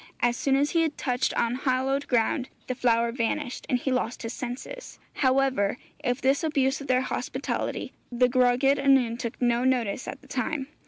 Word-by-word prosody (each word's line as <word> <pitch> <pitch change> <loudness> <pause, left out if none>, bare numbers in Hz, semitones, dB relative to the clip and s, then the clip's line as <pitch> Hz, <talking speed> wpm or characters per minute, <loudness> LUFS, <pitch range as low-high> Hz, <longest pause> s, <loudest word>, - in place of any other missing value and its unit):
As 240 0 +2
soon 270 +1 +1
as 285 +2 +2
he 335 - +3
had 320 -2 -1
touched 250 -2 0
unhallowed 260 +3 0
ground 250 +2 +1 0.2
the 255 - -2
flower 235 -2 +2
vanished, 235 +1 -2
and 250 - +3
he 265 +2 -2
lost 250 -2 -1
his 230 +1 -4
senses. 260 - -7 0.2
However, 260 -6 +2 0.3
of 245 0 0
this 270 +4 +3
abuse 275 -3 +1
of 280 - -8
their 255 0 +3
hospitality 260 - -3 0.2
the 245 +1 +3
Gwragedd 255 +2 +3
Annwn 265 -4 +3
took 235 -2 -5
no 240 0 +2
notice 255 -3 0
at - - -6
the - - -18
time. 300 -4 -2
255 Hz, 175 wpm, -27 LUFS, 245-275 Hz, 0.3 s, he